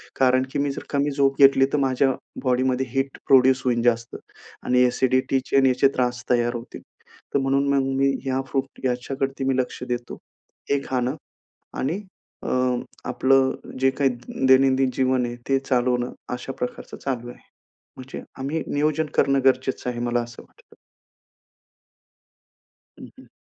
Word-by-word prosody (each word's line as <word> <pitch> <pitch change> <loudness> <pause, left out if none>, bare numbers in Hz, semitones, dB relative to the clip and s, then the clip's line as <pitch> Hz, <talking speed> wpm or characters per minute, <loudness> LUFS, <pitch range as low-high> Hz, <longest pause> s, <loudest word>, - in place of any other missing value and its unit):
कारण 130 0 +3
की - - -2
मी 140 0 0
जर - - -7
कमी 145 0 0
झोप 135 0 +1
घेतली 135 -1 +7
तर - - +3
माझ्या 135 0 +2 0.3
बॉडीमध्ये 130 0 +1
हीट 135 +2 -2
प्रोड्यूस 130 -1 +5
होईल 120 -2 +1
जास्त 115 -1 +1 0.5
आणि 125 0 +4
ॲसिडिटीचे 130 +1 +1
आणि 135 -1 +5
याचे 130 +2 +4
त्रास 125 -1 -1
तयार 120 0 +2
होतील. 120 +1 -8 0.5
तर 140 - +3
म्हणून 135 +1 +1
मग 135 -1 +2
मी 135 0 +3 0.2
ह्या 130 0 0
फ्रूट 135 -1 -4
याच्याकडती 135 +2 -2
मी 135 -1 +1
लक्ष 125 0 -2
देतो. 120 0 -4 0.5
हे 140 - +3
खाणं 130 +2 -1 0.6
आणि 175 +10 -1 0.4
अ, - - -5 0.6
आपलं 135 0 +3 0.3
जे 135 - +5
काही 135 0 +1 0.4
दैनंदिन 130 0 +4
जीवन 130 -1 +1
आहे, 120 0 -5
ते 135 - +4
चालवणं 125 -2 0 0.2
अशा 125 +2 -5
प्रकारचं 125 - -5
चालू 120 -3 -4
आहे. 120 - -12 0.6
म्हणजे 130 +1 -8 0.2
आम्ही 150 +4 -2
नियोजन 155 +2 0
करणं 140 -1 +3
गरजेचं 130 -1 +1
आहे 120 - -5
मला 120 0 0
असं 120 0 -10
वाटतं. - - -24 2.2
हं, - - -10
हं. - - -15
130 Hz, 150 wpm, -23 LUFS, 125-135 Hz, 2.2 s, घेतली